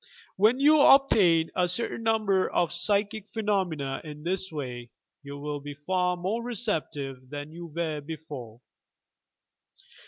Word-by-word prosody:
When 220 +6 +4
you 300 +2 +6
obtain 195 - +5
a 180 -1 +2
certain 230 +5 -1
number 215 -4 +2
of 175 -2 0
psychic 205 0 0
phenomena 190 -10 -1
in 150 -1 -9
this 190 +2 -2
way, 125 -5 -6 0.3
you 140 0 -8
will 145 0 -4
be 145 0 -8
far 180 +4 0
more 195 +7 -2
receptive 150 - -3
than 145 +1 -7
you 170 +1 -8
were 160 -3 -2
before. 145 -7 -8
170 Hz, 130 wpm, -27 LUFS, 145-205 Hz, 0.3 s, you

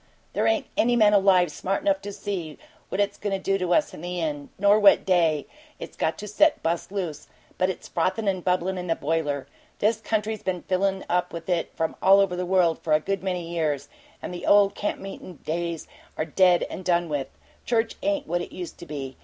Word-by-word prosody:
There - - +1
ain't - - +2
any 240 +1 +3
man 210 -3 +5
alive 190 -4 +4
smart 195 - -2
enough 295 -1 +2
to 205 - -6
see 180 -7 -5 0.3
what - - -3
it's 205 0 0
goin' 205 -1 -2
to - - +1
do 195 +1 0
to 180 -1 -1
us 300 - +2
in - - -9
the 180 0 -4
end, 145 -3 -3
nor 205 +2 +5
what 205 -2 +6
day 165 -5 +2 0.3
it's - - -9
got 160 - -1
set 210 +10 +3
to - - -29
bust 170 +3 -2
loose, 175 -7 -4 0.3
but 185 0 +3
it's 190 - -5
frothin' 190 +5 -1
and 185 -2 0
bubblin' 185 0 0
in 180 - -5
the 165 - +1
boiler. 145 -2 -1 0.3
This 220 +1 +1
country's 220 -1 -1
been 180 -2 -3
fillin' 190 +1 0
up 180 +1 0
with 170 -1 -7
it 175 -2 0
from 160 -1 -1
all 195 +1 +7
over 195 -2 +2
the 180 0 -3
world 180 -3 +3
for 155 - -1
a 155 - +5
good 195 +4 -2
many 180 -3 -3
years, 155 -4 -2 0.3
and - - -5
the 175 - -6
old 200 -1 +5
camp 205 - -3
meetin' 195 -2 -9
days 170 0 -3 0.3
are 155 - 0
dead 180 +2 +4
and 185 - -7
done 175 -1 +1
with. 145 -4 -2 0.4
Church 230 -1 0
ain't 295 -1 0
what 175 -6 -1
it - - -7
used 175 -3 -7
to 170 - -10
be. 135 -3 -6
180 Hz, 220 wpm, -25 LUFS, 165-200 Hz, 0.4 s, all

